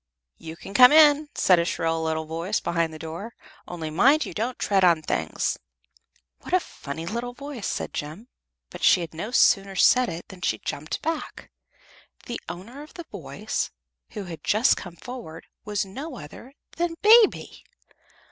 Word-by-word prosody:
"You 160 0 -8
can 195 - -10
come 250 +4 +8
in," 300 -1 +6
said 180 -2 +4
a - - +2
shrill 165 -1 -1
little 160 0 -1
voice 165 +6 -2
behind 170 -1 -1
the 155 - -9
door, 165 +9 -7 0.3
"only 160 -3 -5
mind 275 - +4
you - - -7
don't 235 +4 -3
tread 195 -2 +1
on 170 -3 +4
things." - - -2 0.8
"What - - -1
a - - +5
funny 160 - -8
little 235 +6 -4
voice!" 275 -5 -6
said - - -4
Jem, 155 +11 -6 0.4
but - - -9
she 180 - +5
had 165 -1 -6
no 170 +7 -5
sooner 195 -5 +3
said 250 +6 +4
it 170 0 -7
than 185 -1 -12
she 110 -9 0
jumped 150 +7 -5
back. 325 0 -4 0.7
The 240 - -5
owner 200 +11 -8
of 300 - -13
the 345 - -8
voice, - - -4 0.4
who 210 - -5
had 170 -3 -9
just 220 +5 +3
come 175 -2 -9
forward, 230 -9 -9 0.2
was 205 -1 -1
no 265 +8 -7
other 230 - -11 0.2
than 340 0 -1
Baby. 440 0 +5
195 Hz, 170 wpm, -25 LUFS, 165-255 Hz, 0.8 s, come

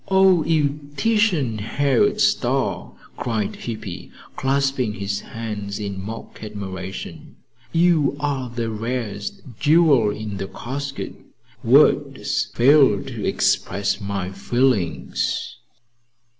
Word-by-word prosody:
"O 190 -3 +5
you 150 -3 0
Titian 195 - +2
haired 145 - +1
star!" 130 - +1 0.2
cried 110 -4 -2
Hippy, 110 -6 -6 0.3
clasping 135 -4 0
his 100 0 -2
hands 105 -3 -5
in 100 -2 -4
mock 110 +2 -8
admiration. 95 -3 -7 0.4
"You 165 -5 +3
are 140 -3 -2
the 115 -1 -3
rarest 110 -2 -4 0.2
jewel 150 -8 +5
in 105 -1 -5
the 95 - -4
casket. 135 +6 -5 0.5
Words - - +3
fail 130 -5 +5
to - - -5
express 100 +2 +1
my 100 -2 -3
feelings. 105 -2 0
120 Hz, 100 wpm, -22 LUFS, 100-145 Hz, 0.5 s, O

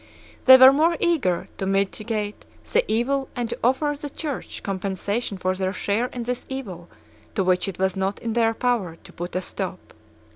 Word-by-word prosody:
They 260 0 +11
were 260 +1 +9
more 325 +4 +3
eager 265 - +1
to 190 - -2
mitigate 205 +2 -1 0.3
the 485 +2 +4
evil 270 +5 0
and 245 -2 -2
to - - -4
offer 265 +5 +2
the 290 0 -6
Church 290 -1 -6
compensation 195 +2 -2
for 185 0 0
their 190 0 -2
share 210 +4 0
in 245 -1 -6
this 245 +1 -3
evil 190 -11 -6 0.5
to 195 - +2
which 185 +1 +2
it 195 - -5
was 190 0 0
not 190 +1 -1
in 230 -1 -4
their 225 -1 +2
power 225 -9 0
to - - -17
put 175 +1 -6
a 185 - 0
stop. - - -6
220 Hz, 185 wpm, -24 LUFS, 190-260 Hz, 0.5 s, They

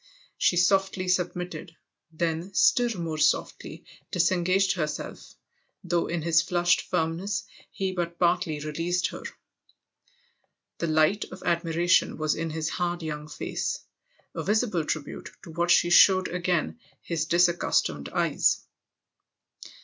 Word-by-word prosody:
She 175 - +2
softly 190 +1 +2
submitted, 180 -2 -2 0.4
then 170 +3 -3
still 240 -6 +3
more 160 -2 -3
softly - - -1 0.2
dis 175 0 +2
engaged 185 +2 +2
herself, 155 -4 -5 0.5
though 175 -1 0
in 170 -2 -3
his 165 0 +4
flushed 175 0 +2
firmness 185 +7 -2 0.3
he 190 -1 -3
but 170 -2 -3
partly 175 -3 +1
released 165 +4 -1
her. - - -8 1.6
The 170 - -1
light 155 +6 +2
of - - -11
admiration 170 +1 +2
was 155 0 0
in 165 +1 -3
his 155 0 -3
hard 175 0 -2
young 150 -1 -5
face - - -3 0.5
a - - -4
visible 210 -6 0
tribute 150 -2 -4
to 165 - -10
what 170 +2 -1
she 175 0 +4
showed 185 +1 +6
again 180 +4 -1 0.2
his 165 -2 -2
disaccustomed 170 - +1
eyes. - - +1
175 Hz, 125 wpm, -26 LUFS, 160-180 Hz, 1.6 s, showed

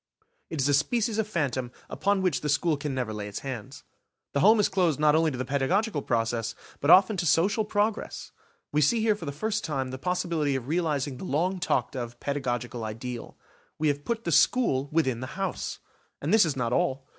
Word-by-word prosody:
It 160 - -5
is 135 - +2
a 145 - +3
species 220 - +1
of 220 - 0
phantom 135 - -2 0.2
upon 200 -1 0
which 180 -6 +1
the 150 - -2
school 155 +2 +2
can 145 -1 -4
never 125 -4 -2
lay 105 -1 -5
its 100 - -6
hands. 125 -6 -7 0.5
The 140 - +1
home 215 +7 +6
is 205 - +4
closed 180 -7 +1
not 150 -1 +4
only 160 0 +3
to 130 - -5
the 130 - -3
pedagogical 145 - 0
progress, 115 -2 -1 0.2
but 145 - -1
often 190 +3 +7
to 175 - -1
social 200 +8 +3
progress. 210 +1 -2 0.4
We 150 - +2
see 220 - +3
here 220 -1 +3
for 180 - -8
the - - -2
first 215 +9 -2
time 135 -5 -2
the 130 - -6
possibility 170 -4 0
of 130 -2 -4
realising 150 -5 -1
the 190 - -7
long 180 +5 0
talked 175 - 0
of 120 -1 -5
pedagogical 125 -4 -3
ideal. 115 +2 -6 0.4
We 155 -1 +1
have 145 0 -2
put 230 +3 -2
the 170 - -2
school 145 - +3
within 130 -7 +1
the 130 +7 -7
house; 195 -2 -3 0.4
and 150 +7 -1
this 220 -4 +6
is 150 - -2
not 120 -2 -1
all. 135 +1 0
150 Hz, 210 wpm, -27 LUFS, 130-185 Hz, 0.5 s, often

